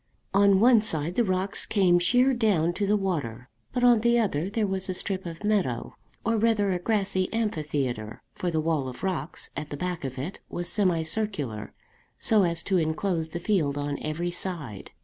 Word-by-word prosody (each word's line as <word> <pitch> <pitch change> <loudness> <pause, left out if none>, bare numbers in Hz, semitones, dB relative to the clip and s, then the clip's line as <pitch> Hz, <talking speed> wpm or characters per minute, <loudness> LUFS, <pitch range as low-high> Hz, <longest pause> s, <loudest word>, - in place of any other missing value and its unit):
On 200 -1 +5
one 235 0 +6
side 165 -6 0
the 240 - +2
rocks 190 0 -1
came 180 -4 +4
sheer 245 +9 +3
down 195 -9 +2
to 200 +2 -1
the 210 +1 +3
water, 135 - -3 0.2
but 245 - -1
on 240 -3 +6
the 235 +1 +3
other 190 -6 0
there 215 +1 0
was 190 -1 -2
a 185 - -1
strip 190 -1 -3
of 165 +3 -8
meadow, 195 - 0 0.3
or 230 0 +2
rather 210 -3 +2
a 180 - 0
grassy 195 -2 0
amphitheatre, 145 - -2
for 180 - -2
the 160 -2 0
wall 155 -4 0
of 125 +6 -8
rocks 180 -4 -3
at 150 - -5
the 145 - -5
back 180 0 -3
of 135 -1 -5
it 150 +9 -5
was 175 0 -3
semi 180 -5 +1
circular, 155 - -3 0.5
so 220 -2 +5
as 170 -2 0
to 190 -2 +1
enclose 160 +1 -1
the 170 - -5
field 170 -7 0
on 145 0 -3
every 165 +3 -2
side. 160 - -4
180 Hz, 190 wpm, -26 LUFS, 155-205 Hz, 0.5 s, one